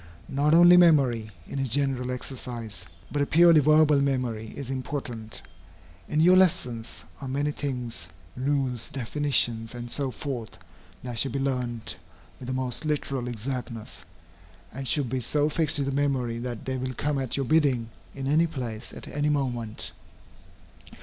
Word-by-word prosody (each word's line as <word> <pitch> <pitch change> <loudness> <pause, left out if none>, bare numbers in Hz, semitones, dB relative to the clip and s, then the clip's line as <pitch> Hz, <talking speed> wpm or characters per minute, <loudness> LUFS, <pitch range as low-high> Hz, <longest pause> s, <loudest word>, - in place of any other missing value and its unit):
Not 145 +3 +3
only 175 +1 +8
memory, 135 -10 +4 0.2
in 140 - -4
its 135 -1 -1
general 130 0 +1
exercise, 120 -7 -5 0.3
but 145 - 0
a 140 - +1
purely 170 0 +6
verbal 150 0 +5
memory, 125 -5 -1
is 135 -2 -5
important. 125 -4 -5 0.7
In 150 - +1
your 180 +3 +6
lessons, 170 -11 +1 0.2
are 135 - -5
many 140 +3 0
things, 125 -5 -4 0.3
rules, 130 -3 -1
definitions, 120 -3 0
and 120 0 -6
so 140 -2 0
forth, 125 -4 -6 0.5
that 120 -2 -4
should 135 - -1
be - - -1
learned 125 -6 -2 0.4
with 125 - -8
the - - -2
most 130 +2 -2
literal 140 -4 -2
exactness, 120 -1 -5 0.7
and 135 +2 -5
should 145 -2 +1
be 130 +2 -2
so 145 +5 +2
fixed 155 0 +4
in 140 - 0
the 140 - -1
memory 135 -4 0
that 120 -2 -5
they 130 0 -2
will 130 0 -4
come 145 +1 -1
at 130 -1 -2
your 135 - 0
bidding, 135 -6 +2 0.3
in 135 -1 -5
any 155 +5 +3
place, 120 -8 -5
at - - -9
any 145 +1 -1
moment. 120 -6 -1
135 Hz, 155 wpm, -27 LUFS, 120-145 Hz, 0.7 s, only